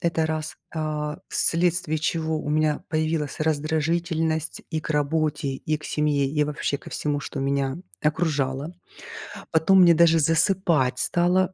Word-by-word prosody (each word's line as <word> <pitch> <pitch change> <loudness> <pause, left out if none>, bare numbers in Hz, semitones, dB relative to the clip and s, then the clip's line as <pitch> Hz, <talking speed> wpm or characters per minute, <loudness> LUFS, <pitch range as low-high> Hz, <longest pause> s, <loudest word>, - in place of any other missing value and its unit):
это 165 -2 +1
1, 155 0 -3 0.2
а, 150 0 -3
вследствие 170 -2 +1
чего 160 0 -1
у 150 - -4
меня 155 0 +1
появилась 155 -2 -1
раздражительность 160 +1 -1
и 160 -1 -1
к 155 - -7
работе, 150 0 0
и 150 +3 -2
к 155 - -15
семье, 150 -2 +1
и 150 +1 +1
вообще 145 -1 -2
ко - - -13
всему, 145 -1 -2
что 135 - -5
меня 135 +1 -1 0.2
окружало. 150 -1 -1 0.8
Потом 185 +4 +5
мне 170 -1 +7
даже 165 0 +5
засыпать 165 -4 +2
стало, 180 +4 +2
155 Hz, 140 wpm, -24 LUFS, 150-165 Hz, 0.8 s, мне